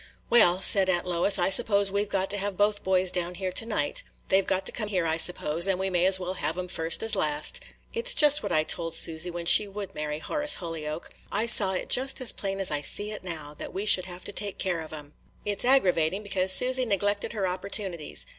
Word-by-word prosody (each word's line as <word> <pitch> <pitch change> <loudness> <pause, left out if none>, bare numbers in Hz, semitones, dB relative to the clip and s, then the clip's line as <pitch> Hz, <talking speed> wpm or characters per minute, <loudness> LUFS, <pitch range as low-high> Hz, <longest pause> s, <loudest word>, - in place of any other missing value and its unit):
"Well," 190 -6 +3
said 195 -1 +6
Aunt 175 -1 -1
Lois, 180 +3 +2
"I 175 - 0
suppose 200 0 +3
we 200 +1 -1
've 210 - -12
got 195 -1 -3
to 205 - -1
have 200 -1 -4
both 205 0 0
boys 185 -1 0
down 180 0 -4
here 185 +1 -5
to 225 - +1
night. 145 -10 -2 0.3
They 190 +1 +2
've - - -15
got 190 0 -2
to - - +2
come 215 -3 -5
here, 185 -4 -2
I 160 0 -1
suppose, 170 0 +3
and 190 -2 -1
we 190 0 -4
may 180 0 +1
as 190 0 +7
well 180 0 -6
have 160 -2 -5
'em 180 0 -6
first 165 +2 -1
as 225 - +4
last. 150 0 0 0.3
It 470 +1 -5
's - - +6
just 295 0 +5
what - - -6
I 155 - +1
told 165 +1 0
Susy, 165 +2 0
when 170 -1 -8
she 205 +4 +6
would 200 0 -9
marry 150 0 -6
Horace 295 - +2
Holyoke. 160 -2 -8 0.2
I 215 +3 -2
saw 200 -4 +3
it 185 - -5
just 265 +2 +1
as 255 -3 +2
plain 195 -1 -6
as 195 - -1
I 145 -1 -2
see 205 +9 0
it 210 - -9
now, 155 -5 -8
that - - -9
we 195 +2 -4
should 185 -3 +4
have 180 0 -12
to - - -10
take 200 0 -6
care 180 -4 -4
of 160 - -12
'em. 150 -1 -12 0.3
It 205 -1 -2
's - - +2
aggravating, 195 -7 +1
because 190 -2 0
Susy 255 +5 +4
neglected 205 -1 -2
her 205 -4 -3
opportunities. 180 - -4
190 Hz, 250 wpm, -25 LUFS, 170-205 Hz, 0.3 s, as